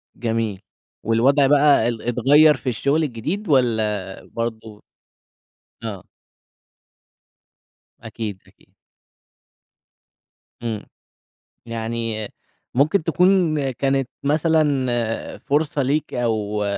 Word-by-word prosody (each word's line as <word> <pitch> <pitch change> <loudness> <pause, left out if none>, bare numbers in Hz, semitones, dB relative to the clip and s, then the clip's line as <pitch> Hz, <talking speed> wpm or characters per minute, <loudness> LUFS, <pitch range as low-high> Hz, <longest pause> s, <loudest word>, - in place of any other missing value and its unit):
جميل. 115 -4 -2 0.4
والوضع 135 +6 +3
بقى 145 -4 +4
ال 115 -2 -3
اتغيّر 145 +5 +5
في 130 - -4
الشُغل 140 +7 +1
الجديد 155 - -3
والّا 110 -7 0
برضه 110 -2 -6 1.0
آه. 100 -5 -6 2.0
أكيد، 110 -4 -6
أكيد. - - -26 1.9
إمم. 110 -3 -4 0.8
يعني 115 -1 -3 0.5
ممكن 155 +8 +3
تكون 165 -4 +2
كانت 135 +1 0
مثلًا 140 -6 0
فرصة 145 0 0
ليك 145 +4 -1
أو 105 -3 -1
120 Hz, 80 wpm, -21 LUFS, 110-145 Hz, 2.0 s, اتغيّر